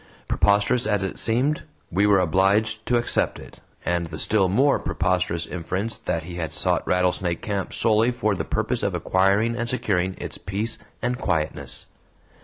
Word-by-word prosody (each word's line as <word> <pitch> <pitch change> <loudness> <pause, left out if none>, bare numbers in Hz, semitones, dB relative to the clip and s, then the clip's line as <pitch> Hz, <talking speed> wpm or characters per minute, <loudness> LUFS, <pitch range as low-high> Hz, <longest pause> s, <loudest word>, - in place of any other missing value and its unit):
Preposterous 105 +4 +3
as 105 -2 +1
it 95 - -4
seemed, 130 +7 +1 0.3
we 100 +4 +3
were 100 -2 +5
obliged 100 +5 +2
to 120 - +3
accept 120 - +1
it, - - -13 0.3
and 85 -1 0
the 80 -1 -7
still 95 +2 +2
more 135 +9 +3
preposterous 90 -2 0
inference 95 +5 -3
that 85 -3 -3
he 85 +1 -8
had 80 -3 -3
sought - - +1
Rattlesnake 90 -1 0
Camp 100 -2 -2
solely 110 +1 +3
for 110 -4 0
the 95 - -2
purpose - - -1
of - - -1
acquiring 100 +5 +2
and 120 -1 -3
securing 95 -7 0
its - - -6
peace 105 +4 -1 0.2
and 125 +1 -1
quietness. 80 -7 -2
100 Hz, 165 wpm, -24 LUFS, 90-110 Hz, 0.3 s, were